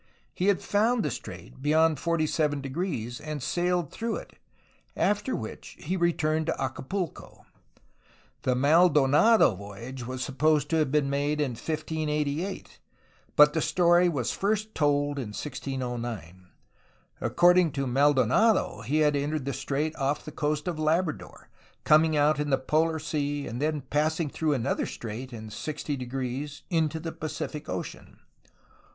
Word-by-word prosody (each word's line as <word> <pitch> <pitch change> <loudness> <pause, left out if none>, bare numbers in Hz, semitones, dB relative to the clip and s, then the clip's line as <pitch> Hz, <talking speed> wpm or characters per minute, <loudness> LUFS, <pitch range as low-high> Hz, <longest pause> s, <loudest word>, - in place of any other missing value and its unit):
He 185 - -1
had 200 -2 +2
found 220 +1 +2
the 150 - -1
strait 95 0 -9
beyond 155 +2 +3
47°, 150 - -1
and 150 -3 -5
sailed 175 -1 0
through 230 0 -3
it, - - -8 0.6
after 210 +5 +1
which 110 - -7
he 180 +5 -3
re 170 -1 +3
turned 155 0 -1
to - - -1
Acapulco. 135 +7 -4 1.0
The 125 - +1
Maldonado 150 - +5
voyage 115 +6 -8
was 130 0 -4
supposed 150 +2 +1
to 165 - +3
have 155 -4 +1
been 150 -1 +2
made 145 +2 0
in 145 -4 0
1588, 155 - -3 0.6
but 150 0 +7
the 160 - 0
story 175 +2 +4
was 130 -8 -1
first 215 +2 -1
told 145 -1 +1
in 110 -5 -5
1609. 120 - -5 0.7
According 175 -1 +4
to 135 -1 -1
Maldonado 140 - +3
he 155 +4 0
had 150 -1 +3
entered 145 0 -1
the 140 - -2
strait 140 +4 -2
off 140 +1 -1
the 155 - -7
coast 150 +2 -2
of 170 -3 -2
Labrador, 155 +1 -1 0.4
coming 155 0 +4
out 145 0 +3
into 150 0 -1
the 135 - +3
Polar 160 +4 +1
Sea 145 -2 -2
and 120 +3 -5
then 150 -1 0
passing 150 +3 0
through 155 -2 0
another 120 -5 -1
strait 120 +4 -6
in 110 -2 -8
60° 135 +1 -4
into 160 -1 +1
the 165 0 -5
Pacific 150 -1 -5
Ocean. - - -6
150 Hz, 140 wpm, -27 LUFS, 135-160 Hz, 1.0 s, but